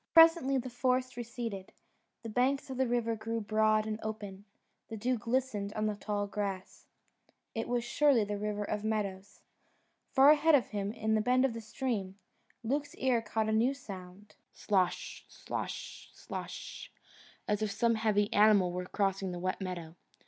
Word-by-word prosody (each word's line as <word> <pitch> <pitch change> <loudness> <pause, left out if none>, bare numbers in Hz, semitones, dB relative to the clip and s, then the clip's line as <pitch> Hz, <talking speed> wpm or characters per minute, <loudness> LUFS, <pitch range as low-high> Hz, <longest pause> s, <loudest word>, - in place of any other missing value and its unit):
Presently 325 -5 +7
the 255 0 -4
forest 255 +1 0
receded: 230 -5 -5 0.5
the 225 - -5
banks 260 +4 +1
of 260 - -5
the 260 -1 +2
river 235 -1 0
grew 225 +1 -3
broad 215 0 +2
and 215 0 -3
open; 205 -2 -6 0.4
the 225 - -5
dew 250 +4 0
glistened 230 -3 -1
on 215 0 -1
the 215 - +1
tall 205 0 -2
grass; 200 -2 -5 0.7
it 225 - -3
was 240 -1 0
surely 265 -1 +3
the 205 0 -3
River 210 0 -2
of 210 0 -3
Meadows. 200 -3 -3 0.7
Far 275 +1 +7
ahead 310 +1 +5
of 255 - +2
him 205 -1 -2
in 220 0 0
a 215 - +2
bend 255 +4 +3
of 260 - 0
the 230 - -6
stream, 215 -4 -3 0.5
Luke's 285 +5 -2
ear 255 -3 +2
caught 220 0 -1
a - - +1
new 235 +5 +2
sound: 195 -4 -10 0.2
SLOSH, 185 -3 -1
SLOSH, - - -6
SLOSH, - - -7 0.6
as 210 0 0
if 215 - 0
some 230 +3 +2
heavy 215 -2 +1
animal 205 -4 +5
were 180 +1 -3
crossing 195 -2 -1
the 175 - -5
wet 185 +2 -2
meadow. 175 -4 -5
220 Hz, 165 wpm, -32 LUFS, 205-245 Hz, 0.7 s, Presently